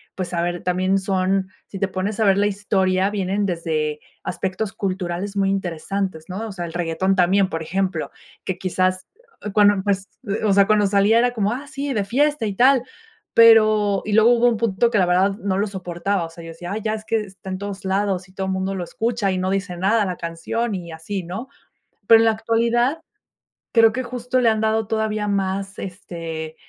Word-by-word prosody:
pues, 185 -1 -4
a 170 - 0
ver, 175 0 -2
también 185 +2 +1
son, 190 0 0 0.2
si 195 - -8
te 200 - +1
pones 195 +3 -3
a 220 - +3
ver 195 -1 +4
la 205 - +3
historia 195 -1 +1
vienen 200 0 -1
desde 155 -4 -2 0.2
aspectos 195 +2 -3
culturales 190 0 -3
muy 195 -1 +2
interesantes, 185 -2 -3
¿no?, 195 +5 -5
o 215 - -7
sea, 175 -3 -5
el 165 - -8
reguetón 175 +3 0
también, 190 +1 +3
por 160 - -4
ejemplo, 185 -1 -2 0.3
que 190 - -2
quizás 185 0 0 0.5
cuando 205 -1 +6
empe 200 +1 +1 0.5
o 210 - +3
sea, 200 0 +5
cuando 210 -1 +3
salía 200 +3 +3
era 245 +1 +3
como, 210 -1 0
ah, 275 +4 -6
sí, 285 -1 -4
de 210 - 0
fiesta 275 +4 +1
y 200 -2 -3
tal, 255 +1 +5 0.5
pero, 215 -3 +6
y 215 - -4
luego 220 +3 +5
hubo 240 0 +4
un 230 - -1
punto 230 +1 +1
que 215 - +2
la 185 - +4
verdad 185 +3 +3
no 195 -4 -2
lo 205 - +1
soportaba, 185 -1 -2
o 165 - -9
sea, 165 0 -12
yo 165 - -9
decía: 175 +3 -7
"Ay 215 - -3
ya, 215 0 0
es 215 0 -6
que 225 -1 0
está 190 -1 -10
en 185 - -3
todos 200 0 -6
lados 190 -1 0
y 185 - -21
todo 190 0 -3
mundo 190 +1 -2
lo 185 - -3
escucha 225 0 -1
y 185 - -1
no 185 +1 -1
dice 195 -2 -2
nada 205 +3 +2
la 180 -2 -3
canción", 170 +7 -3
y 170 -3 -7
así, 180 +4 -5
¿no?, 190 +9 -6 0.6
pero, 225 - +9
en - - +4
la 225 - +5
actualidad 235 +6 +1 0.7
creo 225 -2 +6
que 255 - -2
justo 250 +1 -2
le 230 - +4
han 220 -1 +1
dado 220 -1 +1
todavía 215 -1 -1
más, 195 0 -2
este, 165 -4 -6
195 Hz, 210 wpm, -22 LUFS, 185-220 Hz, 0.7 s, pero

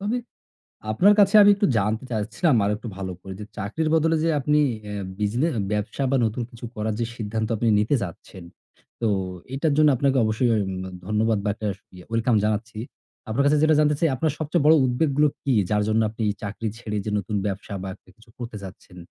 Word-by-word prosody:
তবে 210 +5 -1 0.8
আপনার 200 - +5
কাছে 200 +1 +5
আমি 205 - +7
একটু 200 +1 +1
জানতে 110 +4 0
চাচ্ছিলাম 115 - +1
আরেকটু 105 +3 -2
ভালো 95 -1 -4
করে 95 - -8
যে, 105 - -6
চাকরির 115 +11 -2
বদলে 160 +1 +2
যে 165 - +2
আপনি 150 +2 +2 0.3
এ্যা 100 -1 -4 0.2
বিজনে 115 +9 +1 0.2
ব্যবসা 105 +6 -2
বা 135 - +3
নতুন 115 +2 -2
কিছু 120 0 -9
করার 110 0 -2
যে 115 - 0
সিদ্ধান্ত 110 0 -3
আপনি 115 - 0
নিতে 110 +7 +2
চাচ্ছেন, 90 +1 -9 0.6
তো 115 - +1 0.5
এটার 145 +2 +1
জন্য 155 -1 +6
আপনাকে 135 +1 +2
অবশ্যই 110 +3 +1 0.2
উম 95 - -4 0.3
ধন্যবাদ 110 0 +1
বা - - +1
একটা 110 - -7
আস 95 - -9 0.3
welcome 115 0 +2
জানাচ্ছি। 110 +1 -2 0.5
আপনার 135 +6 +1
কাছে 150 +1 +4
যেটা 155 0 +4
জানতে 150 -1 +3
চাই, 165 - +3
আপনার 155 +2 0
সবচেয়ে 155 0 0
বড় 160 - +7
উদ্বেগগুলো 140 +3 +2 0.2
কি? 135 - +1 0.2
যার 105 0 +2
জন্য 110 +1 +2
আপনি 110 +1 -8
এই - - 0
চাকরি 105 +3 -4
ছেড়ে 105 -3 -4
যে 105 - -2
নতুন 105 +1 -3
ব্যবসা 100 0 -5
বা 95 - -5
একটা - - -26
কিছু 115 +1 -22
করতে 115 -3 -7
চাচ্ছেন, 90 -1 -12
115 Hz, 200 wpm, -24 LUFS, 105-150 Hz, 0.8 s, আমি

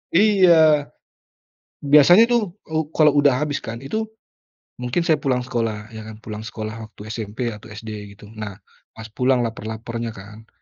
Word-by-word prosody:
Iya. 170 -7 +5 1.0
Biasanya 150 +9 +7
tuh, 235 -5 +1 0.2
u 160 -1 -2
kalau 155 -2 +5
udah 145 0 +5 0.2
habis 145 -1 -2
kan 115 +1 -6
itu, 215 - -3 0.7
mungkin 125 +7 -1
saya 160 -3 +2
pulang 130 -3 0
sekolah, 115 -3 -3
ya 110 - -8
kan, 110 - -9
pulang 105 0 -7
sekolah 110 -2 -6
waktu 110 0 -11
SMP 110 +2 -4
atau 105 0 -11
SD, 110 +1 -9 0.2
gitu. 105 +1 -15
Nah, 105 -3 -7 0.4
pas 110 0 -9
pulang 125 +2 +2
lapar-laparnya 115 +1 -5
kan, 105 +3 -12
120 Hz, 155 wpm, -22 LUFS, 110-150 Hz, 1.0 s, Biasanya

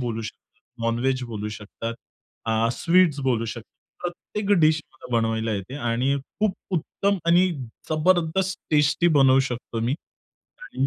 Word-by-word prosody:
बोलू 115 -2 -2
शकता 110 - -7 0.4
नॉन-व्हेज 125 +3 +1
बोलू 105 -3 -4
शकतात. 115 +2 -6 0.5
अ, 115 0 +2
स्वीट्स 170 -1 +3
बोलू 125 -4 +1
शकतो. 115 0 -6 0.4
प्रत्येक 195 +4 -4
डिश 155 0 +4
मला 150 - -12
बनवायला 115 -1 0
येते 100 +6 -4
आणि 125 +4 +1 0.3
खूप 215 -3 +2 0.2
उत्तम 200 +4 0
आणि 175 +2 +5 0.4
जबरदस्त 175 +3 +2
टेस्टी 150 +3 +4
बनवू 135 -1 +6
शकतो 120 -1 -4
मी 120 +3 +1 0.7
आणि 135 - -1
135 Hz, 135 wpm, -24 LUFS, 115-170 Hz, 0.7 s, बनवू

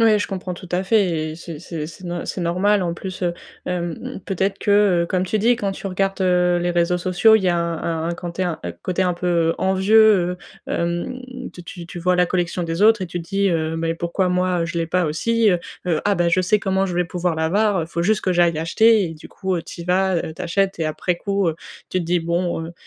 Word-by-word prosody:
Ouais 220 -2 +5
je - - -1
comprends 185 -2 -5
tout 175 0 -11
à 180 +1 +1
fait 185 -6 +1
et 155 - -6
c'est 165 -2 -8
c'est 165 -3 -5
c'est 160 - -12
c'est - - -12
nor 175 0 -3
c'est 185 - -4
normal 185 +4 +2
en 170 -1 -1
plus, 185 +1 -7
heu. 175 -1 +1 0.3
Hem, 175 -2 -4
peut-être 195 +1 -1
que, 200 -4 +3
comme 185 0 0
tu 215 +4 -1
dis, 235 +4 +4
quand 205 -4 -2
tu 195 - -6
regardes, 195 +1 -1
heu, 180 -1 +3
les 175 0 0
réseaux 175 +1 +1
sociaux, 185 +5 +4
il 205 - -2
y - - +3
a 175 - +2
un 165 -1 -2
un 170 - -1
quand 175 0 -6
t'es 185 - -3
un 175 -3 -2
un 85 - -3
coté 180 - -2
un 180 -1 +1
peu, 175 +1 -4 0.2
heu, - - -1
envieux, 190 0 +4
heu. - - -7 0.3
Hem, 175 +9 -2 0.3
tu 175 - -10
tu 175 -1 -9
tu 175 - -8
vois 180 +1 +2
la 180 0 +3
collection 175 0 -1
des 165 +3 -2
autres 220 -1 +5
et 185 - -2
tu 175 +1 -5
dis, 195 +4 0
heu: 160 -1 -1
«Mais 165 0 -1
pourquoi 170 +3 -1
moi 180 -1 +1
je 170 +1 -5
l'ai 165 -1 -2
pas 180 +1 +1
aussi, 225 +9 +1
heu? 180 -3 +2 0.3
Heu, 165 -3 +1
ah 205 -1 +2
bah, 175 0 +2
je 180 +2 +3
sais 195 +4 +2
comment 195 -1 0
je 180 -2 -4
vais 180 - +2
pouvoir 175 -1 -2
l'avoir, 200 +6 +2
heu, - - +1
il - - -11
faut 170 0 -3
juste 215 +4 +2
que 185 - 0
j'aille 175 -1 +4
l'acheter» 200 +7 +3
et 165 -2 -5
du 155 - -13
coup 190 -3 -2
tu 170 - -9
y - - -9
vas, 185 +1 +2
heu, 160 -1 -3
tu - - -7
achètes 190 +1 0
et 160 - +1
après 175 +3 -1
coup, 200 +1 -1
heu, 160 - -1 0.3
tu 185 - -1
te 170 - -4
dis: 175 +1 +1
«Bon 170 0 -1
heu 170 - -9
180 Hz, 265 wpm, -21 LUFS, 170-195 Hz, 0.3 s, Ouais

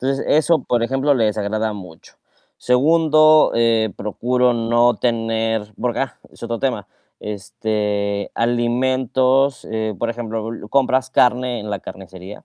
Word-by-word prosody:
Entonces, 135 +1 -1
eso, 160 +2 +3
por 120 -1 0
ejemplo, 135 +3 +1
le 115 -3 +1
desagrada 110 +1 -2
mucho. 90 -5 -12 0.5
Segundo, 155 +3 +4
eh, 115 -3 +2
procuro 125 +4 0
no 120 +1 +2
tener, 115 -2 -1
porque, 120 -1 -1
ah, 135 - -3 0.2
es - - -19
otro 115 -1 -3
tema, 125 -7 -2 0.3
este, 105 -1 -3
alimentos, 130 +3 +1
eh, 110 -1 -2
por 115 0 -1
ejemplo, 115 -1 -5 0.2
compras 130 -1 +1
carne 125 -1 +2
en 105 0 -7
la 100 - -2
carnicería 95 +1 -11
115 Hz, 130 wpm, -19 LUFS, 110-130 Hz, 0.5 s, Segundo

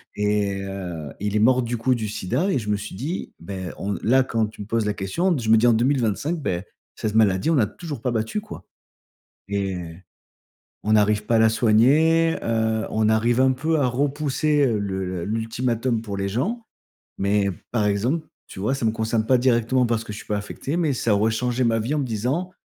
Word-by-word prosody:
et 105 -1 0
heu, 90 -6 -6
il 105 +1 -2
est - - +3
mort, 130 +3 +4
du 120 0 -2
coup, 125 +3 +1
du 110 -2 -3
sida 125 - -1
et 135 - +1
je 105 -2 -6
me 105 - +2
suis 105 -1 -7
dit, 150 - -4
ben 95 0 -6
on 100 +1 -2
là 130 +4 +4
quand 115 -3 0
tu 105 - -11
me 100 - -7
poses 115 -1 0
la 105 - 0
question 140 - 0
je 115 -3 -3
me 110 - +7
dis 110 - +3
«En 120 - +6
2025, 130 - +1
en 85 -1 -1 0.3
cette 110 -1 -3
maladie 105 +3 +3
on 165 - +3
n'a 120 - +4
toujours 145 - -7
pas 125 - -1
battu, 110 - -1
quoi» 210 0 -10 0.8
et 100 -1 -2 1.1
on 110 - +1
n'arrive 105 0 +3
pas 115 - +1
à - - +5
la 110 0 +5
soigner, 145 +10 +4
heu, 110 -1 0
on 110 0 +1
arrive 115 +3 +2
un 130 0 +4
peu 155 +5 0
à 140 - +2
repousser, 145 +2 +1
heu, 115 -5 +1
le 95 -3 -3
l'ultimatum 115 +2 -1
pour 105 -3 -5
les 100 0 -2
gens. 215 - -2 0.5
Mais, 100 0 +1 0.2
par 110 -3 +1
exemple, 120 +11 0 0.2
tu 95 - -10
vois 110 +7 0
ça 135 - -3
me 110 - +3
concerne 110 0 -1
pas 130 +1 +4
directement 125 0 +2
parce 115 -1 -1
que 105 - -7
je 105 - -7
suis - - -11
pas 105 - -1
affecté 105 +9 -4
mais 165 -4 +1
ça 115 -4 +1
aurait 110 +2 +2
changé 125 +2 0
ma 115 -1 +2
vie 115 +7 -1
en - - 0
me - - -1
disant: 130 - -2
115 Hz, 215 wpm, -23 LUFS, 105-130 Hz, 1.1 s, me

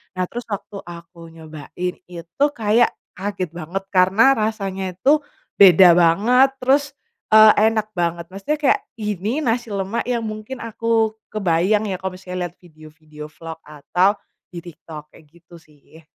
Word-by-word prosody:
nah 185 - -1
terus 240 0 -7
waktu 200 0 -6
aku 170 0 -12
nyobain 160 +3 -7
itu 175 - -2
kayak 225 +1 +2 0.2
kaget 190 -3 -4
banget 175 +3 -6
karena 190 +8 +4
rasanya 195 -4 -3
itu, 285 +11 +3 0.4
beda 180 -2 +8
banget, 215 +11 +4
terus, 280 +2 +2 0.4
eee, 215 0 +8 0.2
enak 215 -1 -3
banget, 170 -1 -1
maksudnya 200 +11 -3
kayak 275 - +2 0.2
ini 210 - -2
nasi 240 -1 -1
lemak 195 +3 -2
yang 235 -2 -1
mungkin 215 +4 -7
aku 225 -1 0 0.2
kebayang 200 +2 +1
ya 185 - -3
kalo 190 -1 -4
misalnya 180 -1 -5
liat 175 - -28
video-video 155 -2 -13
vlog 165 0 -10
atau, 180 +7 0 0.4
di 170 - -7
TikTok 155 -2 -12
kayak 160 - -18
gitu 170 +1 -19
sih. 155 0 -21
190 Hz, 145 wpm, -20 LUFS, 170-220 Hz, 0.4 s, beda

